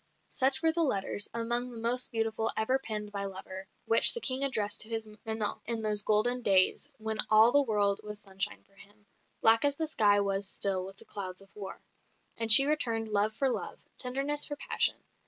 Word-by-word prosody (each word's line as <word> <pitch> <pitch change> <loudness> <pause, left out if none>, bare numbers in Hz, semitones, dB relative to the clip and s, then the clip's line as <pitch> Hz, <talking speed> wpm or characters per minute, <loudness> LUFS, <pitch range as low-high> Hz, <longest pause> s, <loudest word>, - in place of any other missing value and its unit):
Such 265 +1 +2
were 325 - +2
the 335 +1 0
letters 205 -7 -1
among 240 +2 -4
the 240 - -12
most 235 +2 -1
beautiful 225 -1 0
ever 255 +5 -1
penned 210 -4 -6
by 200 -1 -5
lover 190 0 -9 0.2
which 225 - +8
the - - -3
King 265 - 0
addressed 215 -7 -1
to 215 - -1
his 225 -1 -3 0.2
"Menon" 220 -1 -2
in 230 -1 -2
those 210 -1 -2
golden 220 +4 0
days, 195 +6 +1
when 220 0 -7
all 220 +2 +4
the 285 - +2
world 205 -5 -2
was 210 0 -9
sunshine 195 -1 -5
for 195 - -34
him, 205 +1 -22 0.4
black 225 0 +3
as 285 -1 0
the 320 - -4
sky 210 -9 +1
was 195 0 -3
still 195 -2 -2
with 195 +1 -13
the - - -14
clouds 185 -2 -5
of 195 - -22
war. 200 -2 -10 0.5
And 225 -1 0
she 270 +5 +12
returned 230 -7 -2
love 210 +1 -1
for 275 - -2
love; - - -7 0.2
tenderness 275 +3 -2
for 290 - -2
passion. - - 0
220 Hz, 200 wpm, -28 LUFS, 205-250 Hz, 0.5 s, she